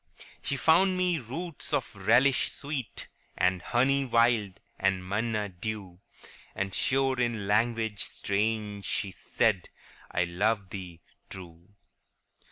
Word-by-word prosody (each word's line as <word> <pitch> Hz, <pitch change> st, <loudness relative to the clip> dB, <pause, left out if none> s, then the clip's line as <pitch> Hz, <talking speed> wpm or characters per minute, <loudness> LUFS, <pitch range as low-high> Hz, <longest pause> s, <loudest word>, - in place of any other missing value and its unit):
* -, -, -22 dB
She 140 Hz, -, -2 dB
found 185 Hz, +6 st, +4 dB
me 180 Hz, -3 st, +2 dB
roots 150 Hz, +6 st, -5 dB
of -, -, -1 dB
relish 125 Hz, +4 st, +4 dB
sweet, 140 Hz, -6 st, -5 dB, 0.3 s
And 90 Hz, -1 st, +2 dB
honey 135 Hz, +7 st, +2 dB
wild, 115 Hz, -6 st, +2 dB, 0.2 s
and 95 Hz, -1 st, +1 dB
manna 105 Hz, +1 st, 0 dB
dew; 95 Hz, -1 st, -6 dB, 0.6 s
And 100 Hz, 0 st, -2 dB
sure 135 Hz, -1 st, +2 dB
in 120 Hz, -4 st, 0 dB
language 110 Hz, 0 st, +1 dB
strange 105 Hz, 0 st, -1 dB
she 100 Hz, 0 st, -2 dB
said, 100 Hz, 0 st, 0 dB, 0.2 s
" -, -, -23 dB
I 90 Hz, -, +2 dB
love 95 Hz, +3 st, 0 dB
thee 90 Hz, -4 st, -7 dB, 0.3 s
true." 90 Hz, +1 st, -11 dB
110 Hz, 125 wpm, -29 LUFS, 95-125 Hz, 0.6 s, found